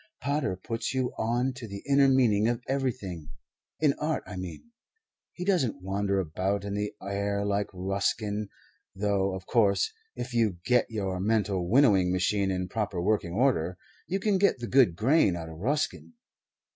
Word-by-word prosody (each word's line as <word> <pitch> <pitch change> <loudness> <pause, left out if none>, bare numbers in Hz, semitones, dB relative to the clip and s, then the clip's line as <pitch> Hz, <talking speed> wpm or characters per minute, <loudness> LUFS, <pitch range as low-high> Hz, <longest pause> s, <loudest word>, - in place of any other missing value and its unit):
"Pater 140 -8 -1
puts 115 +7 -4
you 130 -1 0
on 120 +4 0
to 125 -2 -8
the 100 -1 -8
inner 140 0 +5
meaning 115 -6 +4
of 120 +1 -1
everything 115 - -3 0.5
in 150 -3 +3
art, 155 +1 -1
I 95 - -8
mean. 90 - -7 0.6
He 180 - -6
doesn't 150 - +1
wander 100 +1 0
about 95 +4 -1
in 100 - -3
the 105 0 -3
air 100 +1 -1
like 100 0 0
Ruskin, 100 +2 -2 0.5
though, 100 -1 0
of 95 0 -8
course, 110 - +2 0.2
if 125 - -5
you 110 -6 +2
get 125 -1 +3
your 95 -4 -2
mental 100 -3 0
winnowing 100 -8 +5
machine 95 +2 +1
in 90 -1 -1
proper 105 -3 -2
working 90 -2 0
order 90 -8 +1 0.3
you 190 +2 -1
can 200 -1 +1
get 200 - +3
the 120 - -5
good 120 -8 +4
grain 110 - +3
out 80 -1 -6
of 80 0 -10
Ruskin. 145 - -1
105 Hz, 165 wpm, -28 LUFS, 95-125 Hz, 0.6 s, inner